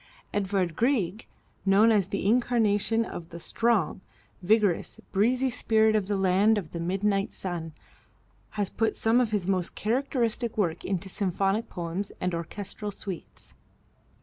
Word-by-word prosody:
Edward 190 -4 0
Grieg, 225 - 0 0.4
known 205 +3 +5
as 200 -4 +3
the 200 - -3
incarnation 225 -1 +2
of 165 -6 -8
the 170 - -8
strong, 210 -3 0 0.4
vigorous, 205 -1 +2
breezy 250 +6 +2
spirit 220 -2 +3
of 205 -3 +1
the 205 -1 0
land 195 +3 +3
of 175 -7 -4
the 170 - -5
midnight 195 +3 0
sun, 170 -3 -4 0.9
has 205 -2 -1
put 225 0 0
some 230 +3 +3
of 240 - +1
his 205 -4 -1
most 185 -3 0
characteristic 235 -1 -1
work 175 -6 0
into 190 0 -2
symphonic 195 +3 -1
poems 175 +3 -4
and 180 -1 -1
orchestral 200 +5 -5
suites. 195 -3 -8
200 Hz, 140 wpm, -27 LUFS, 185-225 Hz, 0.9 s, known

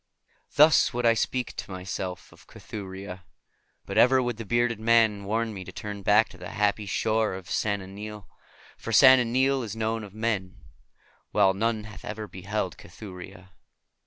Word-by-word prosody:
Thus 150 -3 +5
would 120 0 -1
I 115 - +6
speak 125 +2 -2
to - - -6
myself 95 -1 -6
of - - -19
Cathuria, 95 -2 -8 0.6
but - - 0
ever 130 +2 +6
would 120 -3 -2
the 115 - -6
bearded 120 0 +1
man 110 -3 +3
warn 110 +2 -1
me 95 -2 -7
to - - -10
turn 105 -1 -7
back 105 +3 +4
to - - -15
the - - -7
happy 105 0 0
shores 110 -1 0
of 95 -2 -11
Sona 100 -3 -1
Nyl; 105 +1 -8 0.5
for 115 - -6
Sona 130 +3 +8
Nyl 130 +3 +1
is 110 -3 -6
known 110 0 -2
of 100 -1 -11
men, 105 -5 -2 0.7
while 95 - +3
none 110 +2 -1
hath 105 -1 -11
ever 105 0 -6
beheld 95 +1 -4
Cathuria. 95 0 -11
105 Hz, 165 wpm, -26 LUFS, 95-115 Hz, 0.7 s, Sona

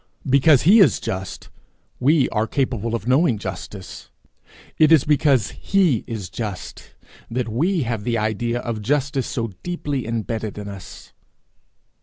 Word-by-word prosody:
Because 140 +1 +5
he 200 +9 +7
is 195 - +5
just, 95 0 -5 0.5
we 140 +2 +3
are 110 0 0
capable 115 -4 -1
of 115 0 -5
knowing 130 -1 +3
justice; 95 0 -8 0.7
it 155 0 +5
is 155 -5 +6
because 140 -6 +2
he 180 - +1
is 110 -6 -5
just, 100 0 -7 0.3
that 120 0 -2
we 160 - 0
have 115 -3 -3
the 115 +1 0
idea 115 +3 -1
of 115 -3 -4
justice 140 +3 0
so 115 -2 -3
deeply 145 -8 -3
imbedded 110 -2 -3
in 105 -1 -6
us. 100 -2 -10
120 Hz, 140 wpm, -22 LUFS, 110-145 Hz, 0.7 s, he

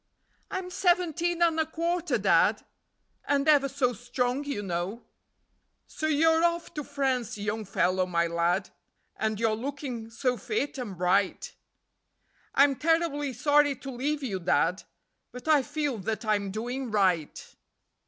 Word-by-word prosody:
"I'm 365 -1 -4
seventeen 345 -1 +1
and 325 -1 +2
a 320 - +2
quarter, 335 -3 -1
Dad, 195 +1 +3 0.6
And 280 0 +1
ever 285 -3 +5
so 255 -2 0
strong, 245 +4 -2
you 280 -8 -3
know."..... 185 +5 -3 0.8
"So 310 - -4
you're 320 +2 +3
off 340 0 0
to 300 - -4
France, 265 -6 -1
Young 210 +1 -3
Fellow 185 -1 +1
My 170 -1 +1
Lad, 170 +3 0 0.4
And 215 -1 -2
you're 225 -1 +2
looking 250 -1 -5
so 250 +2 -1
fit 290 - -3
and 210 -7 -6
bright." 180 +2 +1 1.0
"I'm 275 -1 +5
terribly 315 -3 +1
sorry 290 +3 +3
to 270 +1 -8
leave 280 +4 -2
you, 200 -8 -2
Dad, 175 +1 +1 0.5
But 250 +4 -10
I 305 -3 +5
feel 290 -3 -2
that 220 +4 -3
I'm 205 -2 +1
doing 245 +5 -4
right." 185 -7 0
255 Hz, 140 wpm, -28 LUFS, 210-295 Hz, 1.0 s, ever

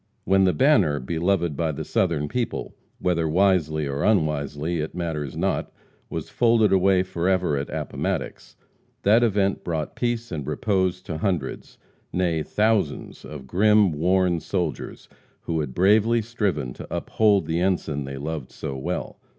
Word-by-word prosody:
When 95 0 +4
the 90 - +3
banner, 105 - +3
beloved 85 +3 0
by 80 +1 0
the 70 - -5
Southern 85 -5 0
people, 120 +7 -3 0.2
whether 85 -3 0
wisely 80 -4 +2
or 70 +1 -2
unwisely, 75 -4 0
it 75 +2 -4
matters 80 -5 -3
not, - - -1 0.4
was - - -4
folded 115 -4 +3
away 95 0 +4
forever 90 -2 0
at 70 0 -3
Appomattox, - - -4 0.5
that 110 +4 +5
event 100 -4 +1
brought 80 -3 -3
peace 120 -1 -2
and 75 -5 -4
repose 95 +3 0
to 80 -2 -5
hundreds, 90 -8 -3 0.3
nay, 85 -3 0
thousands 105 -3 0
of 75 -3 -9
grim, 105 +5 +4
worn 90 +3 +2
soldiers 85 -2 -4 0.3
who 80 -1 -2
had 75 -5 -4
bravely 110 +5 +4
striven 105 - -2
to - - -9
uphold 100 -5 +2
the 80 +2 -1
ensign 85 -6 0
they 70 0 -6
loved 75 -1 -5
so 70 - -6
well. 65 - -4
90 Hz, 145 wpm, -24 LUFS, 75-100 Hz, 0.5 s, that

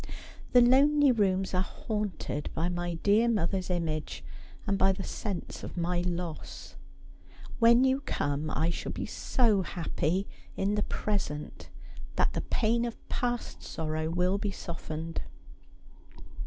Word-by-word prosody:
The 245 - +8
lonely 280 +3 +6
rooms 195 -5 +1
are 185 - +3
haunted 205 -7 -3
by 170 +2 0
my 175 -1 -2
dear 210 +7 +3
mother's 190 -3 0
image, 155 - -2 0.4
and 200 - +1
by 195 0 +4
the 195 0 -5
sense 200 -5 -4
of - - -7
my 175 +1 +1
loss. 175 -2 -5 0.8
When 235 +1 +7
you 265 +1 +3
come 145 - -1
I 160 +3 +1
shall - - -4
be - - -3
so 220 -6 +2
happy 180 +1 -1 0.3
in 200 +1 +1
the 210 - +1
present 180 -10 -3 0.5
that - - +2
the - - -1
pain 235 +1 +1
of 235 - -4
past 240 -1 -2
sorrow 155 0 -2
will 180 +3 +1
be 205 - -1
softened. 165 -3 -5
190 Hz, 135 wpm, -30 LUFS, 170-220 Hz, 0.8 s, The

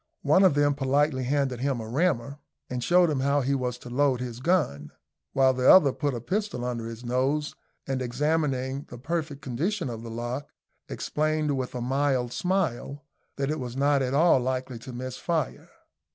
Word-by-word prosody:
One 155 +7 +5
of 185 -7 +5
them 145 0 +3
politely 140 -1 +1
handed 135 -2 0
him 135 -1 -1
a 110 - -6
rammer, 140 0 0 0.3
and 125 -1 -2
showed 175 +1 +4
him 140 - 0
how 140 +2 +2
he 135 +2 0
was 125 -2 -1
to 125 - -11
load 135 -1 +2
his 120 -2 -5
gun, 130 - 0 0.4
while 130 -1 +4
the 130 0 +3
other 145 -8 +7
put 145 -4 -1
a - - -3
pistol 185 - -2
under 120 -2 -3
his 115 +1 -8
nose, 135 +5 0 0.3
and 135 -1 -2
exhibiting 135 +1 -1
the 125 - -9
perfect 150 +1 -3
condition 155 - -2
of 115 -1 -6
the 115 - -8
lock, 120 +4 -4 0.4
explained 155 -1 -1
with 130 -1 -4
a 125 - -3
mild 130 -1 0
smile 145 -4 -1 0.3
that 140 +1 -1
it 155 - -2
was 125 -1 -5
not 140 0 +3
at 130 +1 -1
all 160 -2 +5
likely 130 -1 -3
to 130 - -9
miss 125 +1 -6
fire. 160 -7 -2
135 Hz, 185 wpm, -27 LUFS, 125-150 Hz, 0.4 s, other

